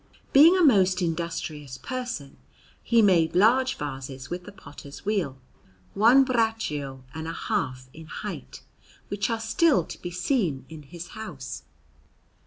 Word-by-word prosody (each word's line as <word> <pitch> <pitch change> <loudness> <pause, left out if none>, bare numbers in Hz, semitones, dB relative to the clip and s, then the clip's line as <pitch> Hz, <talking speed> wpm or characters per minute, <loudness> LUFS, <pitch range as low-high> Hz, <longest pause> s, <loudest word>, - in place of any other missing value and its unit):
Being 320 +7 +8
a 365 - +3
most 190 - +5
industrious 160 -5 -4
person, 245 - -5 0.4
he 230 -2 +3
made 170 -5 +3
large 250 +7 +4
vases 135 -2 -6
with 180 0 -4
the 205 - -9
potter's 145 -5 -12
wheel, 190 -11 -1 0.6
one 235 +6 +6
braccio 220 - -1
and 160 +1 -5
a 165 - -4
half 130 -12 -3
in 160 0 -11
height, 65 - -7 0.5
which 205 +2 -1
are 230 -1 -1
still 225 - +3
to - - -10
be 175 - -4
seen 180 - -1
in 160 -1 -9
his 170 +4 -10
house. 150 -11 -8
175 Hz, 140 wpm, -26 LUFS, 145-225 Hz, 0.6 s, Being